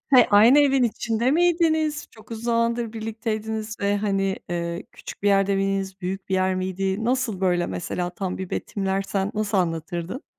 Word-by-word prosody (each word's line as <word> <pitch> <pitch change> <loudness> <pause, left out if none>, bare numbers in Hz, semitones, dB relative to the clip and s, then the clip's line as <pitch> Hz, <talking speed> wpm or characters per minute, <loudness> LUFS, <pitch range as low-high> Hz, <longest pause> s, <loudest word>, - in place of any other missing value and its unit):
He, 250 - +7
aynı 225 +7 +7
evin 275 -3 +4
içinde 230 +1 0
miydiniz? 320 -2 +2
Çok 220 0 -18
uzun 225 0 -6
zamandır 230 -1 0
birlikteydiniz 220 -1 -4
ve 200 0 +1
hani, 195 -2 0
eee, 170 +1 -3
küçük - - -10
bir 205 - +3
yerde 195 0 +3
miydiniz? 195 0 -1
Büyük 190 +1 -4
bir 190 - 0
yer 185 0 +2
miydi? 190 +3 -2
Nasıl 240 -5 0
böyle, 180 -2 +1
mesela, 175 - -3
tam 185 0 -4
bir 190 -1 -6
betimlersen 195 0 -2
nasıl 210 -1 0
anlatırdın? 170 - -3
205 Hz, 160 wpm, -24 LUFS, 190-230 Hz, -, He